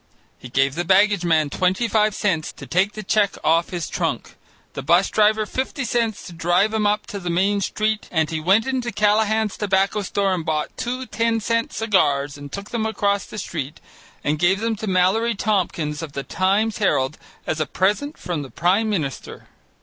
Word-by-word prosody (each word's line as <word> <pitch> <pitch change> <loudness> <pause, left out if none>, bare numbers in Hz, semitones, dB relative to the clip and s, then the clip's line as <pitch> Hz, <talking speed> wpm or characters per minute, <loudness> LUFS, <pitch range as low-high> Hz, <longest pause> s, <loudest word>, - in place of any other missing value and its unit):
He 125 - -10
gave 135 +2 +2
the 175 +4 -2
baggage 195 +1 +3
man 160 -4 +2
twenty 185 +6 +1
five 215 -2 +2
cents 165 -7 0
to - - -10
take 190 +4 +1
the 215 - -7
check 200 +1 +2
off 165 +1 +2
his 175 -4 -4
trunk, - - -3 0.4
the - - -5
'bus 170 +6 +3
driver 215 0 +3
fifty 260 +3 -3
cents 230 -2 -1
to 180 - -9
drive 175 +6 +2
him 215 -1 +1
up 210 +1 0
to 200 - -6
the 180 -2 -4
Main 195 +4 +1
Street, 215 +2 -1
and 160 -3 +1
he 160 - -1
went 190 +8 +3
into 255 -2 -2
Callahan's 215 +1 +1
tobacco 195 0 +1
store 195 0 0
and 175 -3 -2
bought 155 -1 -2
two 255 +2 -3
ten 230 0 0
cent 230 +2 0
cigars 145 -10 +1
and 145 -1 -10
took 200 +1 -7
them 225 -2 -1
across 200 -2 0
the - - -9
street 155 -6 -5 0.4
and 150 +1 0
gave 190 +4 +3
them 225 0 -1
to 215 - -5
Mallory 195 +5 +2
Tompkins 175 -8 -1
of 155 -3 -7
the 140 - -4
Times 200 - 0
Herald 150 -8 +1 0.3
as 155 - -2
a 155 - 0
present 210 +11 0
from 175 -4 -3
the 135 - -8
Prime 190 +9 +1
Minister. 155 - -4
195 Hz, 195 wpm, -22 LUFS, 170-215 Hz, 0.4 s, baggage